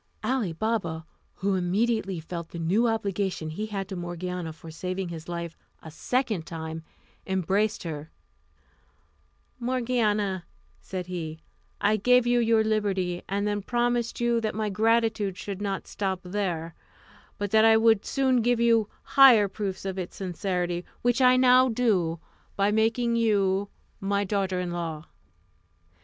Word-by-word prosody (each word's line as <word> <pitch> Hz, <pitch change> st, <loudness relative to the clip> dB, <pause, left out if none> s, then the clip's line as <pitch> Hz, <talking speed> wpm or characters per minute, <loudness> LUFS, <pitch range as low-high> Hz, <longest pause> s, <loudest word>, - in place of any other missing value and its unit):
Ali 250 Hz, -8 st, 0 dB
Baba, 165 Hz, -4 st, -2 dB, 0.3 s
who 200 Hz, 0 st, 0 dB
immediately 195 Hz, +1 st, 0 dB
felt 170 Hz, +1 st, -6 dB
the -, -, -8 dB
new 190 Hz, +9 st, +2 dB
obligation 200 Hz, -7 st, -1 dB
he 210 Hz, +7 st, -4 dB
had 195 Hz, -3 st, -4 dB
to 190 Hz, -, -5 dB
Morgiana 175 Hz, -1 st, -4 dB
for 160 Hz, +1 st, -11 dB
saving 185 Hz, +2 st, -4 dB
his 165 Hz, 0 st, -8 dB
life 170 Hz, -1 st, -4 dB, 0.3 s
a 160 Hz, -, -9 dB
second 215 Hz, -, -1 dB
time, 160 Hz, -1 st, -6 dB, 0.5 s
embraced 195 Hz, +3 st, 0 dB
her: 155 Hz, -2 st, -6 dB, 1.5 s
"Morgiana," 230 Hz, -7 st, 0 dB, 0.3 s
said 185 Hz, -1 st, -5 dB
he, 165 Hz, -3 st, -5 dB, 0.4 s
"I 210 Hz, +1 st, +3 dB
gave 250 Hz, +4 st, +4 dB
you 240 Hz, 0 st, +3 dB
your 225 Hz, -1 st, +3 dB
liberty, 195 Hz, -5 st, 0 dB
and 200 Hz, +1 st, -1 dB
then 205 Hz, 0 st, -1 dB
promised 240 Hz, +2 st, 0 dB
you 235 Hz, -1 st, +2 dB
that 215 Hz, -2 st, -2 dB
my 215 Hz, -1 st, -1 dB
gratitude 220 Hz, -2 st, +1 dB
should 200 Hz, -1 st, -6 dB
not 195 Hz, -2 st, -2 dB
stop 190 Hz, -2 st, -3 dB
there, 180 Hz, -4 st, -3 dB, 0.6 s
but 205 Hz, -1 st, -3 dB
that 220 Hz, 0 st, +5 dB
I 225 Hz, 0 st, +7 dB
would 225 Hz, -2 st, +4 dB
soon 260 Hz, -3 st, +2 dB
give 240 Hz, +1 st, +2 dB
you 230 Hz, -3 st, +3 dB
higher 250 Hz, -7 st, +7 dB
proofs 195 Hz, -1 st, -5 dB
of 190 Hz, 0 st, -3 dB
its 180 Hz, -, -6 dB
sincerity, 180 Hz, -1 st, -2 dB, 0.2 s
which 245 Hz, +1 st, +2 dB
I 255 Hz, 0 st, +6 dB
now 255 Hz, 0 st, +6 dB
do 195 Hz, -9 st, +1 dB, 0.4 s
by 200 Hz, +1 st, +2 dB
making 230 Hz, +2 st, +1 dB
you 200 Hz, -3 st, +2 dB, 0.3 s
my 200 Hz, +1 st, 0 dB
daughter 195 Hz, -2 st, -1 dB
in 180 Hz, -1 st, -3 dB
law." 165 Hz, -3 st, -4 dB
200 Hz, 145 wpm, -27 LUFS, 180-225 Hz, 1.5 s, I